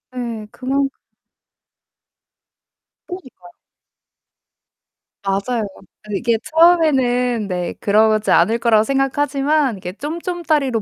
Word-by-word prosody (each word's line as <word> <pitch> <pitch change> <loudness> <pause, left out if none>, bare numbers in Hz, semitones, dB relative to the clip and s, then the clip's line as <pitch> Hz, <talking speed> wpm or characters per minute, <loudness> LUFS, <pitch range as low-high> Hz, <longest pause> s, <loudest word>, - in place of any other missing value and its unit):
예. 230 -4 -5
그만큼 275 +2 -1 2.2
그러니까요. 260 - -11 1.7
맞아요. 200 +4 -1 0.4
근데 210 -2 -4
이게 235 -1 +1
처음에는 260 -9 +3
네. 180 -2 -3
그러지 215 +1 +2
않을 225 +2 +4
거라고 225 -2 +3
생각하지만 275 0 0
이게 180 -1 -7
쫌쫌따리로 305 - -2
250 Hz, 230 characters per minute, -19 LUFS, 215-290 Hz, 2.2 s, 않을